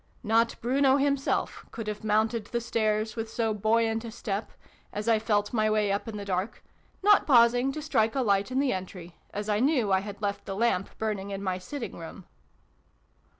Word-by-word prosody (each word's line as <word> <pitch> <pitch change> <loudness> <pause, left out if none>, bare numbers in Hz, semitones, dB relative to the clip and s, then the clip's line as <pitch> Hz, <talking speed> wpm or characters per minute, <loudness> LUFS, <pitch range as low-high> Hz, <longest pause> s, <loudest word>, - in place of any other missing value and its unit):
Not 230 +1 +2
Bruno 265 +3 +3
himself 280 -1 0
could 225 - -6
have 210 0 -5
mounted 220 +1 +1
the 235 - -2
stairs 215 -2 0
with 225 -1 -4
so 225 -1 0
buoyant 225 +2 +1
a 230 - -6
step, 215 -2 -4 0.4
as 210 +2 -5
I 225 -1 +4
felt 210 -1 0
my 215 -2 +2
way 215 -2 +2
up 200 +3 -2
in 220 -2 -5
the 200 - -6
dark, 190 +2 -3 0.4
not 415 0 +5
pausing 245 0 +5
to 305 - -5
strike 225 -7 +1
a 270 - +2
light 200 -1 +2
in 260 +1 0
the 275 -2 +2
entry, 180 -2 -7
as 205 +1 -5
I 210 -1 +1
knew 255 -5 +2
I 190 - +4
had 200 +1 -7
left 200 -1 -3
the 195 - -3
lamp 200 -3 +1
burning 210 -3 -3
in 200 0 -5
my 185 -1 -1
sitting 245 +7 -6
room. 170 +3 -9
220 Hz, 195 wpm, -28 LUFS, 205-235 Hz, 0.4 s, not